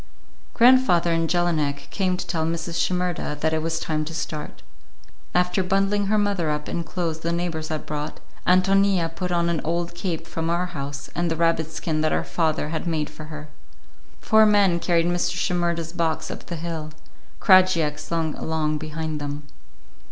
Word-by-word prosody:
Grandfather 235 -9 +5
and 165 -1 +1
Jelinek 150 -5 0
came 185 -2 0
to - - -4
tell 160 -2 -1
Mrs. 165 +1 -2
Shimerda 180 -4 -1
that 160 +1 +1
it 160 - +1
was 165 0 -1
time 155 -2 -1
to 160 +1 -6
start. 150 -1 -5 0.7
After 180 +2 +2
bundling 195 +2 +1
her 215 +2 +2
mother 200 -6 +1
up 150 0 -2
in 170 - -2
clothes 165 -1 -3
the 165 +1 -2
neighbors 170 -2 -2
had 155 -1 -4
brought, 150 0 -4 0.3
Ántonia 185 -2 +3
put 180 0 -3
on 170 -1 +2
an 170 -2 0
old 170 +2 -1
cape 170 -2 -3
from 165 0 -3
our 175 +1 +1
house 140 -5 -6
and 175 0 0
the 165 - 0
rabbit 165 -1 +1
skin 160 -1 -2
hat 155 - +1
her - - +1
father 155 -3 0
had 160 +2 -3
made 155 -2 -1
for 155 0 -9
her. 150 0 -9 0.7
Four 220 -1 +5
men 200 -4 +4
carried 170 -1 +2
Mr. 175 0 0
Shimerda's 170 -2 -1
box 165 -3 -1
up - - -8
the 170 - -4
hill; 160 -2 -4 0.5
Krajiek 185 -6 +4
slunk 160 0 -2
along 155 -1 -1
behind 155 0 -4
them. 145 +1 -4
165 Hz, 175 wpm, -24 LUFS, 155-180 Hz, 0.7 s, Grandfather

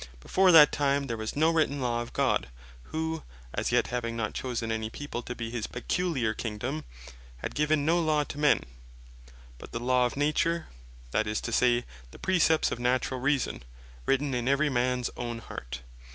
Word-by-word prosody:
Before 185 - +4
that 150 -3 +9
time 140 -1 +1
there 120 -3 -3
was 110 0 -4
no 160 +3 +4
written 155 -3 +1
Law 120 -2 0
of 120 - -7
God, - - +1 0.4
who 160 0 -3 0.3
as - - -1
yet - - +3
having 115 -1 -2
not 110 -2 -2
chosen 120 -3 -3
any 110 0 -2
people 145 0 -5
to 125 +1 -6
bee 115 -1 -5
his 115 -3 -3
peculiar 130 -3 -1
Kingdome, 105 - -4 0.5
had - - -5
given 150 -1 +2
no 170 +2 +3
Law 155 -2 +2
to 145 - -8
men, 150 0 +4 1.0
but - - -11
the 115 - -2
Law 125 +1 +3
of 125 - -8
Nature, 155 +3 +1 0.5
that 110 - +1
is 105 0 0
to 115 - -4
say, 120 0 +3 0.2
the - - -13
Precepts 165 -4 +3
of - - -3
Naturall 125 +1 0
Reason, 140 -1 0 0.5
written 135 0 +1
in 120 0 -1
every 140 +2 +3
mans 125 0 0
own 120 -1 -3
heart. 65 - -7
125 Hz, 180 wpm, -28 LUFS, 115-150 Hz, 1.0 s, that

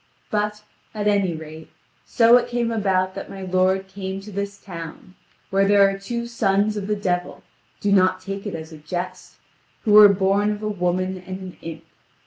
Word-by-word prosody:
But, 210 0 -1 0.3
at 210 -1 -2
any 200 -4 +2
rate, 155 0 -10 0.4
so 235 0 +6
it 245 0 -1
came 240 -1 -1
about 190 -4 +1
that - - -7
my 195 -1 -8
lord 185 +1 +1
came 190 0 -5
to 210 +2 -10
this 200 0 -4
town, 170 -1 -9 0.4
where 195 0 +3
there 200 -1 +6
are 195 0 -3
two 235 +4 -4
sons 210 -3 +1
of 200 -2 -4
the 210 - +1
devil 180 -3 -2 0.4
(do 205 - 0
not 185 -1 +4
take 195 +2 -6
it 205 - -4
as 160 0 -8
a 155 - -11
jest) 180 +4 -6 0.5
who 215 - +2
were 210 -1 +10
born 200 +1 +2
of 210 0 -3
a - - -1
woman 185 -1 -1
and 185 0 -5
an 185 -1 -9
imp. 165 -1 -8
195 Hz, 190 wpm, -22 LUFS, 185-205 Hz, 0.5 s, were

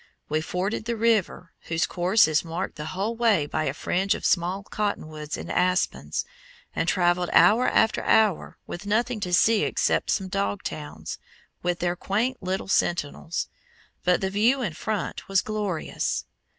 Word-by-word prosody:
We 155 +1 +1
forded 190 +6 -2
the 235 0 -1
river, 215 -6 +1
whose 165 0 0
course 185 +4 +3
is 155 -1 +2
marked 170 +2 -4
the 150 - -6
whole 195 +7 -2
way 225 -9 +3
by - - -2
a 135 - -1
fringe 195 +6 0
of - - -6
small 185 +2 +1
cotton 205 -5 -2
woods 155 -1 -6
and - - -6
aspens, 185 +1 0 0.5
and - - 0
traveled 175 -1 +2
hour 235 +4 +6
after 220 -1 +3
hour 215 -6 +2
with 175 +4 -7
nothing 230 +2 +1
to 180 -3 -3
see 215 +5 +4
except - - +1
some 190 -2 0
dog 200 +1 -2
towns, 150 -1 -6 0.4
with 175 0 0
their 175 0 0
quaint 225 +9 -1
little 185 0 -2
sentinels; 170 -3 -1 0.6
but 180 0 +3
the 190 0 -1
view 235 +6 +2
in 180 -8 -2
front 205 +6 -4
was 195 -1 +3
glorious. 210 -6 -2
190 Hz, 165 wpm, -25 LUFS, 175-215 Hz, 0.6 s, hour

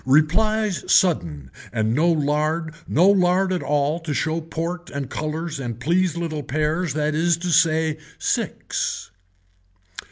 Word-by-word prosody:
Replies 190 +9 +2
sudden 80 - +2 0.2
and 110 -1 0
no 165 +6 +3
lard 155 +1 0
no 175 +5 +4
lard 185 -1 +3
at 180 - -1
all 150 +2 0
to 160 -3 -4
show 160 +1 -1
port 170 +2 -5
and 140 -2 -5
colors 155 0 -3
and 120 -3 -5
please 170 +5 +1
little 160 -3 -3
pears 155 +3 -1
that 150 0 0
is 165 +2 +2
to 175 +1 -4
say 160 -1 +3 0.2
six. - - -2
160 Hz, 135 wpm, -22 LUFS, 150-175 Hz, 0.2 s, no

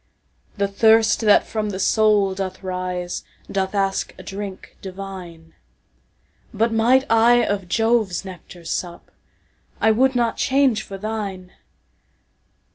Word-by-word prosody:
The 200 0 +1
thirst 220 +1 +4
that 210 -2 +5
from 215 -1 -3
the 190 - -4
soul 210 -1 +3
doth 190 -1 -5
riseDoth 185 +1 -4
ask 195 -1 -1
a - - -11
drink 195 -1 -7
divine; 185 -4 -9 1.0
But 225 +1 0
might 245 +4 +3
I 235 +1 +4
of 200 -3 -2
Jove's 225 -5 +1
nectar 180 -2 -11
sup,I 175 +5 -5
would 260 +4 +2
not 235 -2 0
change 265 -5 +2
for 195 -2 -8
thine. 200 -3 -5
200 Hz, 115 wpm, -21 LUFS, 190-225 Hz, 1.0 s, that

